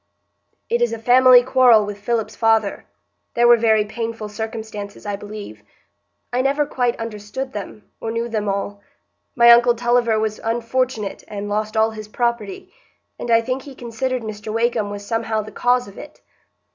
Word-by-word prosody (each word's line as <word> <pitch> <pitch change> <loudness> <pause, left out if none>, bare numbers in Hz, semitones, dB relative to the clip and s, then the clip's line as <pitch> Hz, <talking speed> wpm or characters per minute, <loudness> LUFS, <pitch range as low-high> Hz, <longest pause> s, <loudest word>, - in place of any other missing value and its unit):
"It 235 +1 0
is 240 -1 +1
a - - -3
family 250 +2 +6
quarrel 245 -4 +5
with 205 0 -7
Philip's 220 0 -2
father. 225 -3 +1 0.5
There 240 0 +4
were 240 - +8
very 220 -2 +2
painful 225 0 -5
circumstances, 215 -1 -7
I 205 -1 -2
believe. 205 - -9 0.7
I 250 - +2
never 280 +2 +1
quite 245 -3 -1
understood 225 +4 -6
them, 205 0 -8
or 225 - -3
knew 230 +1 -2
them 215 -3 -2
all. 200 +1 -3 0.5
My 235 -1 +7
uncle 240 0 +6
Tulliver 240 -1 +2
was 215 -1 -2
unfortunate 230 -1 -2
and 205 0 -6
lost 215 +1 -2
all 220 0 +3
his 215 -1 -9
property, 235 -3 -3 0.5
and 240 - -5
I 230 0 +5
think 255 +3 -3
he 275 0 -12
considered 245 +1 -3
Mr 215 0 -6
Wakem 225 -2 0
was 205 0 -7
somehow 225 -1 -1
the 215 - -10
cause 245 -1 +1
of 200 - -12
it. - - -12
225 Hz, 170 wpm, -20 LUFS, 210-240 Hz, 0.7 s, were